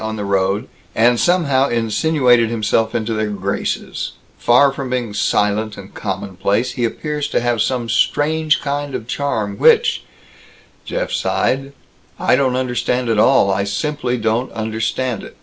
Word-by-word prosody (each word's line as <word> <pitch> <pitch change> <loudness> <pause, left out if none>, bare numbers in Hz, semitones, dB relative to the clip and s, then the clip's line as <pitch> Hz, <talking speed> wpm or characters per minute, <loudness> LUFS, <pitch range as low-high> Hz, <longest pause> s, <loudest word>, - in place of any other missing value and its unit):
on 110 0 -3
the 105 -2 -4
road, 100 +4 0 0.3
and 120 +1 +4
somehow 140 -7 +2
insinuated 120 +1 +2
himself 110 0 0
into 115 0 -1
their 110 -1 -1
graces 100 -1 -3 0.2
far 135 +3 +4
from 135 -2 -5
being 125 -4 -2
silent 105 +1 0
and - - -11
commonplace, 100 +6 -2
he 120 0 -3
appears 150 +5 -2
to - - 0
have 120 -2 0
some 125 -1 -1
strange 155 +6 +1
kind 145 -1 -3
of 110 - -5
charm 110 -7 -2
which," - - +4 0.8
Jeff - - -3
sighed, 135 +1 0 0.5
"I - - +3
don't 130 -2 +1
understand 125 -1 -1
at 110 -2 +2
all. 100 -2 +4
I 100 +1 0
simply 125 +5 -2
don't 115 +3 -1
understand 110 +2 -2
it! - - -12
120 Hz, 150 wpm, -18 LUFS, 110-135 Hz, 0.8 s, and